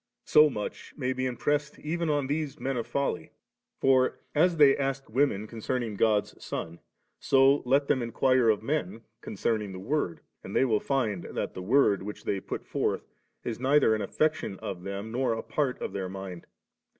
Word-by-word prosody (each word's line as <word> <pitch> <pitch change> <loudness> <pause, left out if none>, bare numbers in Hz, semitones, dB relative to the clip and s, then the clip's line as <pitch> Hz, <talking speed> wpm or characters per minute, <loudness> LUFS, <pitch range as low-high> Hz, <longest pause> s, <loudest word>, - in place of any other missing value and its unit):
So 150 0 +6
much 105 -6 -6
may 130 -3 -1
be 130 0 -1
impressed 145 +4 -1
even 165 +2 -2
on 145 -2 +1
these 150 +1 -2
men 135 0 -2
of 120 - -3
folly; 140 -12 -2 0.5
for 130 -1 +3 0.2
as 170 +3 +3
they 145 -3 +7
asked 135 -3 -3
women 120 -5 +1
concerning 115 0 -3
God*s 105 0 +2
Son, 85 +1 -5 0.4
so^ 135 +1 +4
let 140 +2 +3
them 135 -3 +2
inquire 125 +1 +2
of 110 -1 +2
men 140 -4 -2 0.2
concerning 105 -1 -2
the 95 - -7
Word, 100 - -2 0.2
and - - -7
they - - +4
will 110 -4 +2
find 110 -10 -1
that - - -4
the 95 - -6
word 105 -1 +3
which 105 +2 -7
they 100 - -1
put - - -6
forth - - -1 0.4
is 115 -1 -4
neither 135 -2 +4
an 110 - -1
affection 155 -1 -1
of 90 - -6
them 100 +3 -5
nor 125 0 +1
a 115 - -4
part 140 -4 -1
of - - -4
their 95 -2 -3
mind. 95 -2 -8
130 Hz, 180 wpm, -28 LUFS, 105-140 Hz, 0.5 s, they